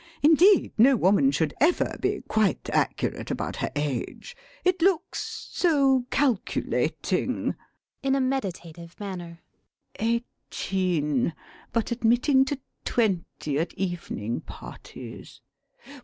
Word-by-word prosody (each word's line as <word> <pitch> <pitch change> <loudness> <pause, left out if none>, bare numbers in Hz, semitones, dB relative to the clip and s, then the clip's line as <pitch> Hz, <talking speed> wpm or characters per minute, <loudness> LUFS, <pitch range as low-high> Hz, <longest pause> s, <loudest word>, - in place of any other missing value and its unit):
Indeed, 340 +6 +6
no 265 +4 +7
woman 205 +6 +4
should 160 - 0
ever 335 +4 +3
be - - 0
quite 215 -4 0
accurate - - -1
about - - -3
her - - -1
age. 145 - -3 0.3
It 365 -1 +2
looks 370 -2 0
so 275 -7 +3
calculating... 255 -8 0 0.5
[In 270 0 +2
a - - +2
meditative 175 -10 -3
manner.] 175 -4 -7 0.6
Eighteen, 185 - -1 0.4
but 230 +1 -1
admitting 245 +3 +3
to 285 -1 -3 0.2
twenty 180 - 0
at 165 - -2
evening 170 - -3
parties. - - -10
225 Hz, 100 wpm, -26 LUFS, 170-270 Hz, 0.6 s, no